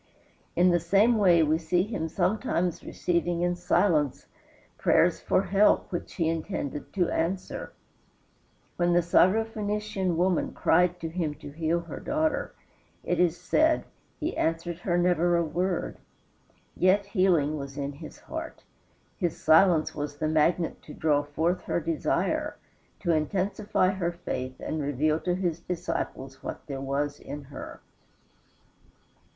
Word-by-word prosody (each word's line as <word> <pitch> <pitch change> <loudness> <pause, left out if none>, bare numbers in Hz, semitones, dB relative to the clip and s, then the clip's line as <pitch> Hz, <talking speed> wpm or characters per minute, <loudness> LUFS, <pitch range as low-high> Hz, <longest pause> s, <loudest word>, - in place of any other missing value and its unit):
In 180 +1 +5
the 175 - +3
same 200 +7 +3
way 175 -5 +5
we 155 +1 +2
see 175 +2 +1
him 195 -6 -3
sometimes 180 -1 0
receiving 175 0 -1
in 175 0 +1
silence 175 -5 +1 0.5
prayers - - +3
for 190 - +1
help 200 +2 +3
which 175 - -5
he 165 -4 0
intended 160 -3 -3
to 180 -3 +1
answer. 180 +3 -2 1.1
When 175 0 +2
the 175 0 +4
Syro 185 +6 +4
Phoenician 210 -4 -2
woman 180 0 +1
cried 180 +1 +2
to 165 - -3
him 160 -3 -2
to 145 -1 -10
heal 165 +3 0
her 170 -3 -8
daughter, 310 +1 -1 0.5
it - - -1
is 175 -1 +2
said 315 0 +2 0.3
"he 320 +2 -2
answered 165 +1 -1
her 175 -1 0
never 175 -1 +3
a 170 - +2
word;" 175 +3 -2 0.8
yet 190 +3 +3
healing 185 -7 +2
was 140 -2 -7
in 140 0 -2
his 155 +3 -11
heart. 320 +1 -7 0.5
His 175 -5 -2
silence 160 0 +4
was 145 -1 -5
the 155 - -1
magnet 160 +2 +1
to 150 - -11
draw 150 -2 +2
forth 160 +5 -1
her - - 0
desire, 165 -1 -1 0.4
to 170 - +1
intensify 190 +4 +1
her 180 -3 -2
faith 130 -7 -5
and 155 - -3
reveal 145 +2 +1
to 180 +1 -1
his 175 -3 -1
disciples 150 -6 -4
what - - -7
there 135 -2 -5
was 140 +2 -2
in 145 +1 -7
her. 140 0 -9
170 Hz, 145 wpm, -27 LUFS, 155-185 Hz, 1.1 s, In